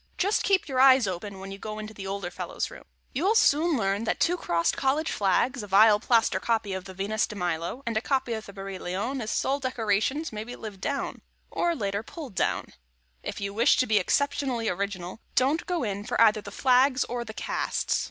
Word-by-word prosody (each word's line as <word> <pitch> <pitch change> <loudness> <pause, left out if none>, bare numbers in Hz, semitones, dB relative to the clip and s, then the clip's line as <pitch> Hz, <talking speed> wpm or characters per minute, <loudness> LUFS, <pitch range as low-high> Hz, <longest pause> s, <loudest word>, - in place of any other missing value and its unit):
Just 405 +3 +2
keep 390 -3 +2
your 260 -3 -1
eyes 260 -2 +7
open 190 +1 -5
when 195 0 -8
you 195 - -8
go 215 0 -6
into 215 -2 -7
older 195 -2 -4
fellows' - - -4
rooms. - - -12 0.3
You'll 375 - +2
soon 320 -5 +4
learn 200 0 0
that - - -1
two 350 - +3
crossed 170 - 0
college 290 +4 0
flags, 215 +5 +1
a 205 - -7
vile 210 +2 +6
plaster 230 +1 +2
copy 220 -4 0
of 190 0 -5
the 190 - -9
Venus 205 +3 0
de 210 - -8
Milo, 175 +6 -3
and 230 -2 -2
a 220 - +2
copy 265 -2 0
of 220 -1 -5
the - - -8
Barye 195 -1 -7
Lion 205 +10 -3
as 215 - -4
sole 275 +5 0
decorations 255 - -1
may 210 0 -4
be 245 +2 -8
lived 205 -4 -9
down, 280 -1 -3 0.3
or 345 -1 0
later 200 -5 -2
pulled 280 - -9
down. 185 - -1 0.5
If - - -5
you 200 0 -3
wish 230 +4 +4
to 255 - +3
be 215 -3 +3
exceptionally 270 +1 0
original, 190 0 -4 0.2
don't 280 +6 +2
go 350 -5 -1
in 205 -2 -3
for - - -3
either 215 -2 +5
the 200 - -9
flags 255 +4 +3
or 240 0 -4
the 220 -2 -9
casts. - - -1
220 Hz, 210 wpm, -27 LUFS, 200-265 Hz, 0.5 s, eyes